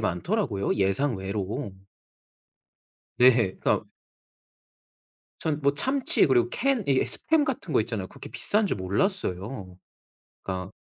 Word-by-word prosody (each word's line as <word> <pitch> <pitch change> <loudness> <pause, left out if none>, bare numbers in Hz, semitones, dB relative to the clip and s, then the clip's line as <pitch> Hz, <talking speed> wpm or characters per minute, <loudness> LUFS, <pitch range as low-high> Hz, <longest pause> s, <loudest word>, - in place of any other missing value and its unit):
많더라고요 105 - -1
예상외로. 100 +1 -1 1.5
네. 125 +1 +8 0.3
그러니까 - - 0 1.6
전 155 -1 -2
뭐 140 0 +2
참치 265 - +3
그리고 120 -4 +3
캔 265 -5 0
이게 135 -2 +2
스팸 320 -2 +1
같은 255 - -4
거 125 - +4
있잖아요. 105 -4 -3
그렇게 - - -11
비싼 210 0 +1
줄 - - -1
몰랐어요. 100 - -2 0.7
그러니까 95 0 -5
125 Hz, 260 characters per minute, -26 LUFS, -, 1.6 s, 네